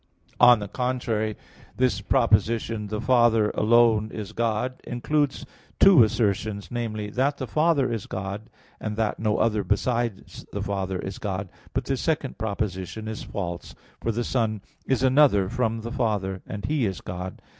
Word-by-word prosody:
On 125 -1 +8
the 105 -1 -5
contrary, 115 -3 -1 0.4
This 125 -6 +1
proposition 115 -1 +1
"The 105 +1 -3
Father 120 -4 +3
alone 110 -1 +4
is 105 -2 -6
God" 115 +2 -1
includes 145 +4 -1 0.3
two 195 -8 +8
assertions 105 -2 -1
namely, 110 -3 -3
that 135 +5 +1
the 130 - -3
Father 150 -3 +2
is 110 -4 -4
God, 100 +3 -5 0.3
and 105 -1 -4
that 110 -2 0
no 105 -1 +1
other 110 -2 +1
besides 115 +1 -1
the - - -3
Father 95 -1 -2
is 95 +1 -6
God. 95 -2 -3 0.2
But - - -1
this 135 -2 -1
second 150 -7 -1
proposition 105 -1 -3
is 110 -1 -5
false, 85 -3 -5 0.3
for 115 - 0
the 120 +2 -1
Son 110 -4 -1 0.3
is 130 -1 +1
another 130 -7 +5
from 115 -1 -1
the 115 +1 -6
Father, 105 -7 -1
and 100 -2 -5
He 145 -7 +1
is 95 -3 -4
God. 90 +1 -6
110 Hz, 155 wpm, -25 LUFS, 105-125 Hz, 0.4 s, On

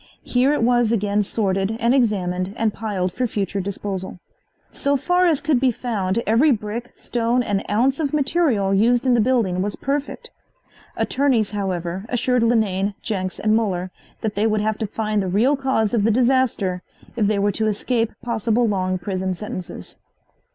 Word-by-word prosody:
Here 255 +3 +2
it 295 - +1
was 240 -1 +3
again 205 -2 +1
sorted 195 0 -1
and 235 +2 +2
examined 195 -6 0
and 220 -2 +1
piled 195 -5 -2
for 250 +3 -1
future 200 -2 -2
disposal. 190 -1 -5 0.5
So 280 0 0
far 355 +6 +2
as 315 -5 +2
could 300 -5 +2
be 260 0 +3
found 225 -3 -2
every 230 +8 +4
brick, 230 0 -2
stone 240 +1 0
and 205 -3 -1
ounce 255 +7 +2
of 290 -4 0
material 275 - +1
used 235 +6 +3
in 255 - +4
the 240 - +3
building 215 -7 +1
was 205 +1 -2
perfect. 290 - -4 0.7
Attorneys, 255 -7 +1
however, 185 -3 -3
assured 250 0 +1
Linane, 205 -4 +1
Jenks 185 -4 -3
and 215 0 +2
Muller 185 -5 -1 0.3
that 220 -3 -2
they 210 +2 +1
would 215 -1 +1
have 215 0 -1
to 220 - -2
find 215 0 -1
the 190 - -2
real 225 +10 +3
cause 265 -6 0
of 225 -4 +2
the 220 - +3
disaster 235 -6 +1 0.3
if 220 -4 +1
they 210 0 +1
were 200 +1 +2
to 220 +2 -1
escape 225 +2 0
possible 230 0 +1
long 185 -3 0
prison 185 0 -3
sentences. 185 - -7
220 Hz, 170 wpm, -21 LUFS, 195-245 Hz, 0.7 s, every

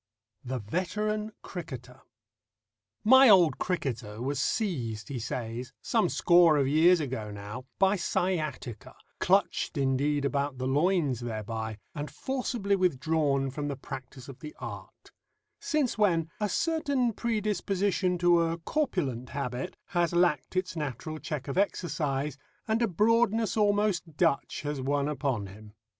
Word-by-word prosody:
THE 130 0 -3
VETERAN 210 - -2
CRICKETER 130 -7 -8 1.0
My 260 +3 +8
old 175 -9 +6
cricketer 115 - -3
was 135 +2 -2
seized, 130 - -1
he 135 -3 -3
says, 120 +2 -5
some 220 -7 +1
score 170 -3 +5
of 140 -2 +2
years 165 +5 +5
ago 125 -8 -3
now, 105 +5 -7
by 195 +1 +3
sciatica, 155 - -2 0.2
clutched - - +1
indeed 140 +2 +1
about 140 -1 -1
the 130 - -3
loins 145 -1 +2
thereby, 110 -2 -4 0.2
and 145 0 -5
forcibly 240 -6 -1
withdrawn 145 -5 +1
from 145 +2 -4
the 140 - -2
practice 130 -1 -9
of 135 -2 -10
the 150 -1 -9
art; - - -9 0.5
since 290 -7 0
when 165 -6 +2
a 210 -1 0
certain 280 - +1
predisposition 200 -4 0
to 175 -1 +4
a 165 0 0
corpulent 165 - -2
habit 140 +3 -4
has 175 -1 +1
lacked 175 -3 +2
its 185 -1 -1
natural 155 +1 -4
check 150 -4 -5
of 140 +7 -1
exercise, 150 -7 -1 0.3
and 220 +1 +1
a 235 - +3
broadness 225 +3 +2
almost 205 -6 +1
Dutch 165 -4 +1
has 145 -2 -3
won 140 +1 0
upon 135 -8 -1
him. 105 +2 -12
155 Hz, 135 wpm, -29 LUFS, 130-190 Hz, 1.0 s, My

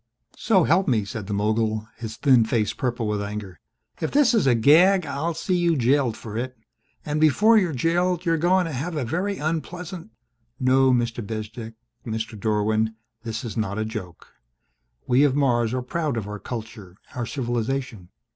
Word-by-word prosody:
"So 195 -5 +3
help 175 +5 +2
me," 110 -6 +1
said 100 0 -6
the 105 - -3
mogul, 110 +1 0
his 115 -1 -7
thin 130 -5 +5
face 110 -1 0
purple 120 -4 -2
with 105 -1 -1
anger, 100 -5 -6 0.4
"if 160 - -1
this 275 -4 +4
is 215 -11 +2
a 125 - +5
gag 170 - +5
I'll 160 +4 -2
see 180 +3 -1
you 170 -2 +2
jailed 130 -2 +2
for 110 -2 -8
it! 130 +1 -5 0.5
And 150 +1 -1
before 210 - +5
you're 180 -5 0
jailed 175 +5 0
you're 165 -1 +2
going 180 +2 +3
to 165 - -4
have 155 +6 -4
a 135 - -1
very 180 - -1
unpleas 165 +3 -4 0.4
" 120 +2 -46
"No, 130 0 +4
Mr. 120 -1 0
Bezdek 110 +2 -6 0.3
Mr. 110 0 -4
Dorwin 110 +1 0 0.3
this 115 -1 -5
is 115 - -5
not 110 -2 -2
a 110 - -1
joke. 105 -6 -8 0.7
We 125 +3 +4
of 140 -2 +3
Mars 120 -5 +2
are 130 0 -2
proud 150 -1 -2
of 105 -3 -4
our 105 0 -6
culture, 110 -6 -8 0.2
our 120 -2 -3
civilization. 120 -5 -3
125 Hz, 180 wpm, -24 LUFS, 110-155 Hz, 0.7 s, thin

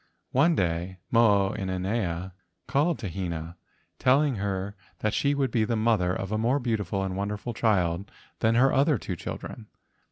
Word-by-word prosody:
One 160 +6 +4
day 90 - -1
Mo 105 -4 +4
o - - -4
inanea 95 -2 -2 0.3
called 145 +5 +1
to 105 - -5
Hina, 85 -2 -4 0.4
telling 135 -1 +3
her 100 0 -3 0.2
that 110 0 -1
she 140 0 +2
would 135 -3 0
be 115 -2 +2
the 115 +2 0
mother 110 -5 +2
of 95 +2 -3
a 110 - 0
more 120 +5 +2
beautiful 105 -7 -1
and 95 -1 -3
wonderful 100 +4 -3
child 100 -4 +1 0.3
than 110 +1 +3
her 135 +3 +4
other 140 +1 +3
two 95 - -5
children. 110 +6 -7
105 Hz, 165 wpm, -27 LUFS, 95-120 Hz, 0.4 s, One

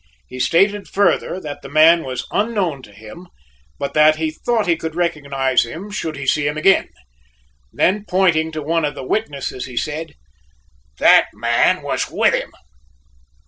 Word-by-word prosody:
He 130 - -9
stated 195 +8 +2
further 195 -1 0
that 145 -1 -7
the 135 - -10
man 160 +3 +5
was 130 -1 -5
unknown 200 - -1
to 105 - -15
him, 110 - -13 0.5
but 140 -1 -4
that 155 0 +5
he 155 0 -2
thought 220 +6 -1
he 170 -2 +2
could 160 -1 -6
recognize 140 -6 0
him 170 - -8
should 160 -6 -4
he 140 - -6
see 145 +2 +1
him 150 +1 -2
again. 195 +5 +3 0.8
Then 200 - 0
pointing 175 -4 +2
to 155 -1 -5
one 165 +2 0
of 145 -1 -2
the 130 - -7
witnesses, 140 - -3
he 125 -2 -10
said: 155 +1 -4 0.8
"That - - +5
man - - +1
was - - -2
with - - +2
him!" - - -2
155 Hz, 165 wpm, -19 LUFS, 140-180 Hz, 0.8 s, man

